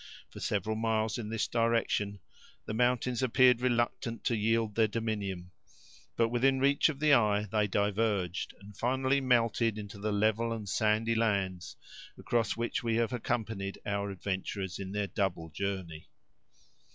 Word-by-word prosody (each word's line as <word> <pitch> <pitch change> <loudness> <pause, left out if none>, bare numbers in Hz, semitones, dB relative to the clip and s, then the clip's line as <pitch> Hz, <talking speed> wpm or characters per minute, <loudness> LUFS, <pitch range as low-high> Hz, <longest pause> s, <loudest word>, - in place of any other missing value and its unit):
For - - -10
several 105 +2 -1
miles 110 0 0
in 105 -3 -5
this 115 -1 -1
direction, 115 -3 0 0.4
the - - -4
mountains 125 +1 +1
appeared 125 -1 +4
reluctant 120 -2 -1
to 120 - +1
yield 110 0 +1
their 110 +1 +3
dominion, 100 -5 -3 0.6
but 115 -1 +2
within 130 +3 +2
reach 140 +3 +4
of 140 -3 -5
the 150 -1 +4
eye 105 -4 +4
they 105 0 0
diverged, 100 -3 0
and 100 +1 -13
finally 130 +4 +1
melted 115 -3 +2
into 100 -1 -8
the 105 +1 -1
level 110 +3 +1
and 110 -3 -6
sandy 110 +3 +1
lands, 100 -5 -1 0.4
across 115 -3 0
which 115 0 -1
we 115 -2 0
have 115 0 +1
accompanied 110 -4 -2
our 100 0 -1
adventurers 95 0 -4
in 95 -1 -5
their 105 0 -1
double 95 -5 -2
journey. 95 -3 -4
110 Hz, 150 wpm, -31 LUFS, 100-115 Hz, 0.6 s, appeared